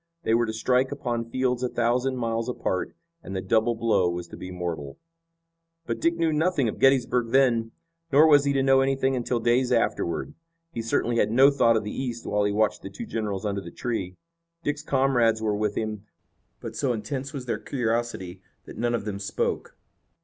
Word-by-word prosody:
They 110 - +1
were 120 0 +3
to - - -1
strike 125 +4 +1
upon 120 -4 -3
fields 125 0 0
a 125 - 0
thousand 125 +3 0
miles 115 0 -1
apart, 95 -6 -2 0.3
and 95 - -7
the - - -1
double 110 +4 +2
blow 105 -6 +2
was 85 0 -4
to - - -9
be 90 - -8
mortal. 85 -6 -5 0.9
But - - -3
Dick 170 0 +2
knew 165 -2 +1
nothing 155 -4 +1
of 110 - -4
Gettysburg 125 -3 +3
then, 120 -3 +2 0.4
nor 145 +3 +7
was 145 -2 +6
he 140 - +2
to 135 -1 +2
know 135 0 +5
anything 135 0 +1
until 120 -1 -1
days 120 +2 +2
afterward. 115 - 0 0.4
He 115 - -4
certainly 115 +1 0
had 105 - +3
no 135 +5 +6
thought 115 -5 +3
of 110 - -2
the 105 - -5
East 120 -3 -4
while 105 0 +1
he 105 - +1
watched 105 +1 +1
the - - -7
two 235 - -7
generals 105 - -3
under 100 -1 -1
the 85 - -9
tree. 95 -4 -4 0.5
Dick's 145 0 -2
comrades 130 -6 +2
were 110 -1 0
with 105 0 -1
him, 110 -1 -4 0.5
but - - -7
so 135 -4 0
intense 130 +5 -4
was 135 -5 -6
their 120 - -2
curiosity 115 -7 -2 0.2
that - - -10
none 120 0 +1
of 110 - -4
them 100 -2 -4
spoke. 100 - -3
120 Hz, 200 wpm, -26 LUFS, 105-135 Hz, 0.9 s, nor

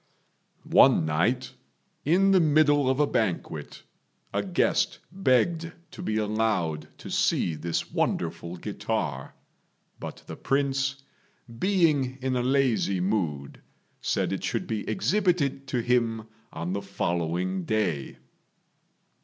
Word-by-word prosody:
One 80 - +5
night, 115 +12 0 0.5
in 190 +6 +4
the 190 - +6
middle 145 -3 +4
of 130 +1 +1
a 150 - +5
banquet, 110 -10 -2 0.5
a 100 - +1
guest 95 -3 +1
begged 165 0 +1 0.2
to - - -9
be 110 -11 -1
allowed 105 -7 0
to - - -9
see 85 - +1
this 80 +2 -3
wonderful 85 +1 -2
guitar; - - -3 0.6
but - - -8
the - - -7
Prince, 135 0 0 0.6
being 155 -9 +2
in 130 0 -1
a 125 - +1
lazy 125 -7 +2
mood, 85 -8 -2 0.4
said - - 0
it - - -4
should - - -1
be 110 -2 -3
exhibited 175 -9 +1
to 125 -2 -1
him 115 -3 +1 0.2
on 85 +3 -4
the 100 - -2
following 90 +2 -2
day. 90 -10 -1
120 Hz, 120 wpm, -27 LUFS, 90-140 Hz, 0.6 s, the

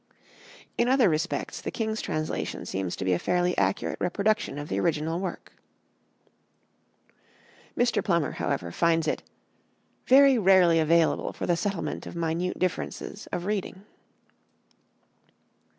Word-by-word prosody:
In 235 - +3
other 255 -6 +4
respects 160 +2 -2
the - - -4
king's 220 -1 -2
translation 155 0 -3
seems 95 -2 -3
to 95 - -5
be 95 - +2
a 85 - 0
fairly 180 - +1
accurate 95 0 -1
reproduction 205 0 0
of 145 0 -5
the 95 - -2
original 160 - 0
work." 185 -2 -6 2.2
Mr. 240 -1 +2
Plummer, 170 -6 +1
however, 85 -1 -3
finds 165 - +1
it - - -1 0.9
"very 270 -1 +6
rarely 185 -4 +5
available 160 +1 +2
for - - -4
the 175 - +2
settlement 185 +2 -3
of - - -8
minute 170 +2 -2
differences 185 +3 -3
of 175 - -3
reading." 195 -1 -3
175 Hz, 125 wpm, -27 LUFS, 155-200 Hz, 2.2 s, very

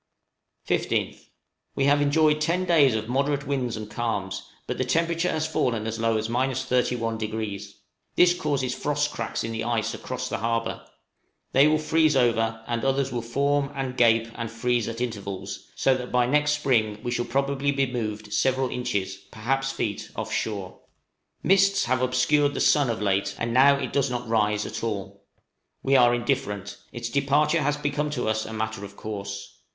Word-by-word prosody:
15th. - - -1 0.5
We 135 - +1
have 145 +1 +4
enjoyed 150 +1 +3
ten 170 +4 +1
days 150 -9 +4
of 110 0 -2
moderate 140 +3 0
winds 130 -5 -1
and 110 -1 -6
calms, 105 -5 -3 0.2
but - - -4
the - - +2
temperature 170 +1 +1
has 155 -2 -1
fallen 120 -8 0
as 110 0 -3
low 115 0 +2
as 110 0 -2
31°. 115 -5 -1 0.4
This 180 0 +6
causes 140 -7 -1
frost 145 +1 -1
cracks 115 - -3
in 115 - -3
the 110 0 -3
ice 115 -2 -1
across - - -5
the - - -3
harbor; 115 0 -1 0.7
they 140 +3 +6
will 155 0 +3
freeze 155 -1 +2
over, 115 -3 +1
and 120 -1 -2
others 135 0 +1
will 120 - -2
form, 140 +4 0
and 135 -2 -3
gape, 115 -2 +4
and 115 -1 -5
freeze 120 0 0
at 115 +1 -5
intervals, 100 -5 -5
so 135 - +3
that 125 -1 -5
by 125 -1 +3
next 150 +3 +2
spring 110 -8 +1
we 120 - -2
shall 120 0 -1
probably 140 +3 0
be 135 -1 +1
moved 110 -4 -4
several 130 -1 +1
inches, 100 -6 -2
perhaps 135 +5 -1
feet, 105 -6 -3
off - - -4
shore. 100 -4 -3 0.6
Mists 195 +1 +4
have 130 +1 +1
obscured 130 +3 +2
the - - -2
sun 145 -4 +4
of 110 -2 -2
late, 100 0 0
and 115 0 -2
now 140 +3 +6
it 135 -3 -4
does 140 -1 +2
not 125 -1 -4
rise 105 -2 +1
at - - -5
all. 100 -2 -5 0.6
We 135 0 +3
are 120 -2 +6
indifferent; 120 -5 -2
its 120 -1 -5
departure 145 +5 +2
has 145 +1 +1
become 145 0 -1
to 125 - -1
us 110 0 0
a - - -7
matter 110 -1 -3
of 100 0 -9
course. 100 -2 -6
125 Hz, 180 wpm, -25 LUFS, 110-140 Hz, 0.7 s, This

